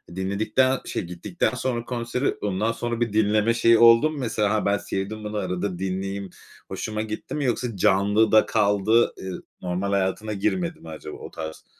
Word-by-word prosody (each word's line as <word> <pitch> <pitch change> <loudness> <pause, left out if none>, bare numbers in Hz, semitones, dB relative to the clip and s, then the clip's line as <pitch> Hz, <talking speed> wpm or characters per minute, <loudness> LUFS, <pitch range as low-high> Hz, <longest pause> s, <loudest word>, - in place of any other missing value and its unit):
dinledikten 110 +7 +1
şey - - -3
gittikten 90 - -2
sonra 125 -2 -2
konsere, 125 +2 -2
ondan 105 +2 0
sonra 120 0 -3
bir 115 -3 0
dinleme 110 +1 +3
şeyi 115 0 +5
oldu 115 +5 +7
mu? 155 - -6
Mesela, 110 -5 0
"Ha, 110 - 0
ben 100 0 +2
sevdim 100 +3 -4
bunu, 105 0 -4
arada 90 -1 -2
dinleyeyim 95 +1 -3 0.4
hoşuma 110 0 -4
gitti." 110 0 -5
mi 145 -2 -1
yoksa 120 -1 -1
canlıda 105 +3 +4
kaldı, 105 +2 +2
ııı, 95 -1 -6 0.2
normal 90 +2 -2
hayatına 100 +2 0
girmedi 170 - -1
mi 80 - -11
acaba 75 -1 -8
o - - -10
tarz, 80 -1 -7
105 Hz, 170 wpm, -24 LUFS, 95-115 Hz, 0.4 s, oldu